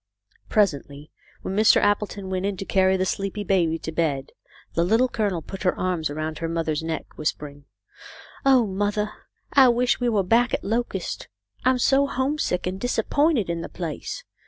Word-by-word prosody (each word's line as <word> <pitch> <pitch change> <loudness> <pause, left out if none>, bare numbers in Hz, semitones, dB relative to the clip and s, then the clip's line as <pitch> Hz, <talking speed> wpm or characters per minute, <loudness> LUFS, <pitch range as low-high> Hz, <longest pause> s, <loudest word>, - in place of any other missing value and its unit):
Presently, 145 -7 0 0.3
when 190 - -3
Mr. 215 +1 +6
Appleton 205 -1 0
went 185 0 -1
in 200 -2 -3
to 195 - -5
carry 190 0 +3
the 185 - 0
sleepy 195 +2 -2
baby 175 -4 +1
to 160 - -6
bed, 150 -5 -1 0.4
the 170 - +2
Little 225 +8 +3
Colonel 200 -9 -1
put 195 - -8
her 180 - +1
arms 180 -4 -1
around 155 +1 -4
her 165 - -3
mother's 160 -2 -1
neck, 160 0 -3
whispering, 145 -1 -4 0.4
" - - -13 0.3
Oh, 265 -4 +5
mothah, 205 +2 -1 0.4
I 265 -3 +7
wish 245 +1 +2
we 245 -1 +1
were 210 -4 +2
back 235 +6 +3
at - - -6
Locust. 220 -3 -2 0.4
I'm 255 0 +4
so 275 +3 +3
homesick 265 -8 -1
and 185 +1 -3
disappointed 245 - +1
in 170 -1 -2
the - - -6
place. 165 -5 -5
190 Hz, 175 wpm, -24 LUFS, 165-225 Hz, 0.4 s, I